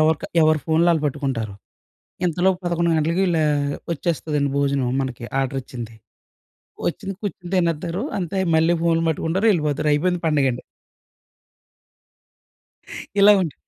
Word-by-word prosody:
ఎవరిక 155 0 +2 0.2
ఎవరి 155 0 +4
ఫోన్‌లు 160 +2 +3
వాళ్ళు 160 -3 +1
పట్టుకుంటారు. 130 -8 -3 0.7
ఇంతలోపు 180 +2 +2
11 170 -1 +1
గంటలకి 165 +4 +1
ఇలా 160 -2 +2 0.5
వచ్చేస్తదండి 150 -3 -1
భోజనం 140 -3 +1
మనకి 130 -3 -5 0.2
ఆర్డర్ 135 0 -1
వచ్చింది. 120 -4 -8 1.0
వచ్చింది 195 - -5
కుర్చుని 180 -3 -5
తినేత్తారు. 170 +2 -1 0.2
అంతే 185 +1 -3 0.2
మళ్ళీ 165 +2 +3
ఫోన్‌లు 165 -1 +2
పట్టుకుంటారు. 165 +6 -1
ఎళ్ళిపోతారు. 150 -3 0
అయిపోయింది 180 +3 0
పండగండి. 135 -5 +1 2.6
ఇలా 205 +1 +8
ఉంటు 160 -6 -4
160 Hz, 115 wpm, -22 LUFS, 140-170 Hz, 2.6 s, ఇలా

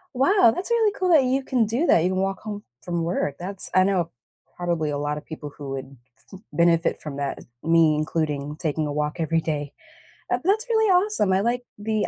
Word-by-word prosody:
Wow, 270 - +5
that's 380 +6 -4
really 445 -3 +3
cool 370 -1 0
that 300 -6 +6
you 265 +1 +1
can 245 -4 +1
do 240 +10 0
that, 165 - +5
you - - +2
can 185 - -1
walk 195 0 -1
home 210 -1 -6 0.2
from 170 -1 -2
work. 165 -4 -1
That's 185 +2 -3
I 185 - +6
know 180 -4 0 0.4
probably 170 -3 -1
a 145 - -2
lotta 145 +1 -2
people 150 -1 -8
who 140 -2 -6
would 135 0 -6 0.3
m 195 +3 -12
benefit 170 0 +2
from 145 -2 -6
that, 140 -1 -3 0.2
me 165 -2 +4
including 150 -2 -2
taking 155 -1 -1
a 145 - -3
walk 150 +2 -2
every 165 0 +1
day, 145 -3 -3 0.6
eh, - - +3
that's 430 +6 +1
really 440 -1 +3
awesome. 365 - +3
I 190 - +3
like 245 +2 0
the 215 0 -1
175 Hz, 210 wpm, -24 LUFS, 150-240 Hz, 0.6 s, that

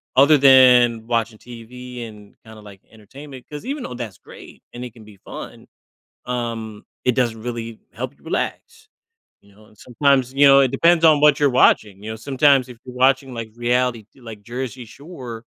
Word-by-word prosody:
other 145 +3 +6
than 125 -4 +5
watching 115 -2 -2
TV, 125 +1 -10
and, 105 -2 -15
kinda, 110 -1 -14
like, 100 -2 -15
entertainment, 130 +5 -13
'cause 150 +9 -9
even 280 -1 -4
though - - -7
that's 120 -6 -7
great, - - -15
and 120 +1 -8
it 125 - -9
can 110 -2 -16
be 105 -2 -16
fun, - - -11 0.6
um, 115 -3 -5 0.2
it 125 - +1
doesn't 115 -3 -1
really 115 -2 -6
help - - -7
you - - -27
relax, 455 -2 -5 0.5
you 100 0 -24
know? 105 +1 -21
Sometimes, 130 +3 0
you 145 - +5
know 135 0 +7
it 130 - +2
depends 165 +4 +2
on 155 -2 +5
what 150 -2 +4
you're 145 -2 +3
watching, 105 -5 +2
you 110 - -6
know, 110 - -6
sometimes, 135 +1 +2
if 120 - -12
you're 125 - -10
watching, 130 0 +1
like, 115 -1 -7
reality 120 -1 -1
t 135 - -22
like, 110 -3 -11
Jersey 125 +1 -7
Shore, 120 -3 -11
125 Hz, 185 wpm, -20 LUFS, 115-135 Hz, 0.6 s, know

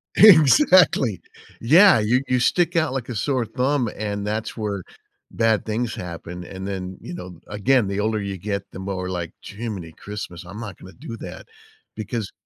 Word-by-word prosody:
Exactly. 165 - +6 0.4
Yeah, 170 - +7
you 120 +5 +2
you 125 - +2
stick 175 +7 +2
out 160 -5 +1
like 130 -2 -4
a 120 - -4
sore 125 +3 0
thumb, 125 +2 0
and 100 -1 -3
that's 110 +2 -3
where 105 -4 -3 0.5
bad 115 -2 +1
things 115 +1 -2
happen, 90 0 -7
and 95 +2 -7
then, 95 -1 -5
you - - -8
know, 90 -2 -9
again, 105 +2 +2
the 100 +1 -2
older 110 0 0
you 100 -1 -4
get, 100 +1 -3
the - - -9
more 95 -1 -4
like, 85 -3 -4
"Jiminy 100 -6 -6
Christmas, 95 -4 -8
I'm 100 +4 -9
not 105 -6 -7
gonna 95 - -13
do 130 -7 -8
that," - - -9 0.5
because 110 -1 -4
105 Hz, 175 wpm, -23 LUFS, 95-125 Hz, 0.5 s, Yeah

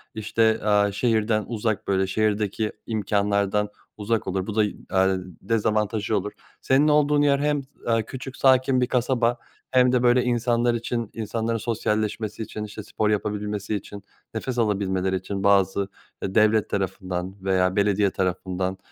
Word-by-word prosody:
işte, 110 +1 +1
aaa, 105 -1 +3
şehirden 110 0 +1
uzak, 110 -2 -2
böyle, 95 -1 +1
şehirdeki 105 +1 0
imkânlardan 105 -1 0 0.3
uzak 110 0 -1
olur. 95 0 -2
Bu 105 - -4
da 110 - +4
y 105 - -1 0.2
aaa, 95 0 +3 0.3
dezavantajı 110 -1 0
olur. 100 +1 -3 0.3
Senin 140 +3 +3
olduğun 150 -1 +4
yer 140 -1 +3
hem 145 -1 0
s - - -23 0.2
aaa, 115 -1 +3
küçük 130 +2 -8
sakin 130 -1 +4
bir 125 - +2
kasaba 120 -1 +1 0.3
hem 125 -1 +4
de 125 -1 +2
böyle 125 +1 +4
insanlar 120 0 +1
için, 115 -1 -3
insanların 115 +1 -2
sosyalleşmesi 110 -1 -2
için, 105 - -6
işte 105 0 -7
spor 105 +1 -1
yapabilmesi 105 0 -2
için, 100 0 -7 0.3
nefes 125 +3 -3
alabilmeleri 95 -3 0
için 95 +2 -4
bazı, 100 0 +3 0.4
eee, 95 - -3
devlet 110 0 +4
tarafından 95 -1 -3
veya 95 -1 +2
belediye 100 -1 +2
tarafından, 95 0 -2
105 Hz, 150 wpm, -24 LUFS, 100-115 Hz, 0.4 s, da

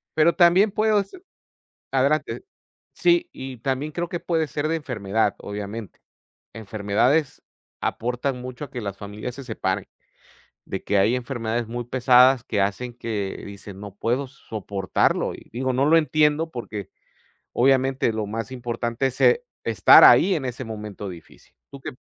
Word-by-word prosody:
Pero 160 +2 +4
también 185 +4 +5
puedo 215 0 +2
s 200 - -11 0.7
Adelante. 140 +3 +1 0.5
Sí, 345 0 +2
y 130 -2 -8
también 135 +5 -2
creo 175 +1 -3
que 175 - -3
puede 160 -2 0
ser 145 +2 -2
de 165 - 0
enfermedad, 110 -8 -1
obviamente. 105 +1 -7 0.5
Enfermedades 110 +7 0 0.4
aportan 125 +2 -2
mucho 130 +3 -7
a - - -16
que 125 - -5
las 100 -1 -5
familias 105 +4 -7
se 140 - -8
separen. 95 -5 -2 0.8
De - - -5
que 105 - +1
hay 110 +6 +3
enfermedades 120 -2 -3
muy 120 0 -5
pesadas 125 0 +5
que 105 - -2
hacen 120 +5 -2
que, 105 -5 -4
dicen: 100 -1 -10
"No 100 -1 -9
puedo 125 +6 -1
soportarlo" 100 - -1
y - - -13
digo, 130 +3 -1
no 130 +3 +1
lo 160 +2 +5
entiendo 155 +1 +2
porque 105 -5 -6 0.6
obviamente 135 0 +2
lo 110 -1 -3
más 115 +4 -5
importante 120 0 -2
es, 130 - -4
eh, 475 +1 +4 0.2
estar - - +7
ahí 195 - +7
en 145 - -2
ese 125 +1 -5
momento 105 -2 -7
difícil, 85 -2 -13 0.2
¿tú 140 -1 -11
qué? - - -6
125 Hz, 155 wpm, -23 LUFS, 110-140 Hz, 0.8 s, estar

